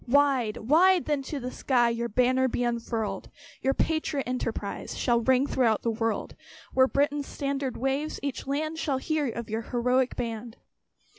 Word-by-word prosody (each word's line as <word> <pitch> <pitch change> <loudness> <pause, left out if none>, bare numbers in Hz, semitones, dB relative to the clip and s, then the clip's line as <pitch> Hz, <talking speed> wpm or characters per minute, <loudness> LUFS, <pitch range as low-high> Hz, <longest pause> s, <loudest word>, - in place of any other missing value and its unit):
Wide, 265 -4 +3
wide 345 +8 +4
then 295 -2 0
to 275 +2 -5
the 250 0 -5
skies 240 -4 +2
Your 235 0 -2
banner 255 +3 +3
be 245 0 -1
unfurled! 235 -2 -2 0.3
Your 270 +1 +1
patriot 315 -3 0
enterprise 230 -5 -3
Shall 235 -2 +2
ring 260 +3 +3
throughout 240 -6 +1
the 230 - +1
world. 225 0 -2 0.4
Where 260 0 +5
Britain's 285 +1 0
standard 275 -2 -3
waves, 270 +4 -1
each 280 -1 -4
land 310 +3 -2
Shall 280 -4 0
hear 300 +1 -1
of 235 -1 -5
your 220 +1 -1
heroic 250 +2 +1
band. 230 0 -5
260 Hz, 160 wpm, -27 LUFS, 235-280 Hz, 0.4 s, Where